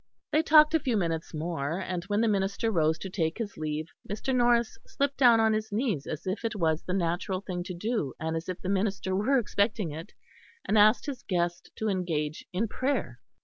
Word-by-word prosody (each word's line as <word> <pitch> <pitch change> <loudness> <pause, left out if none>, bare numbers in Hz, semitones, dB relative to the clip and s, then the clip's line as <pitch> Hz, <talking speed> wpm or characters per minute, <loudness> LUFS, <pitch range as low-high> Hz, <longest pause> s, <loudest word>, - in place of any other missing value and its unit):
They 310 - +4
talked 305 -1 +6
a 320 - +4
few 250 -6 0
minutes 165 -4 -2
more, 160 0 -3
and 180 -2 -3
when 205 +2 0
the 230 - +3
minister 200 +2 0
rose 160 -4 +2
to 190 - -6
take 165 -3 -1
his 220 -3 -4
leave, 155 0 -3 0.2
Mr. 220 +6 -2
Norris 240 -2 +2
slipped 280 0 -2
down 240 -4 +6
on 220 0 +4
his 215 0 -2
knees 210 - -1
as 155 - -5
if 190 +5 -3
it 230 0 -2
was 160 -4 +1
the 180 - -4
natural 180 +1 -1
thing 180 -3 -4
to 185 - -5
do 210 - -2
and 160 +1 -2
as 165 +3 -4
if 185 - -4
the - - -3
minister 195 -1 0
were 225 +8 +2
expecting 210 -5 0
it; 160 +7 -8 0.5
and 215 - 0
asked 215 +2 +5
his 280 -4 -5
guest 175 -2 -2
to 220 - -2
engage 165 -6 -1
in 200 +6 0
prayer. 265 +6 -2
195 Hz, 210 wpm, -28 LUFS, 170-225 Hz, 0.5 s, talked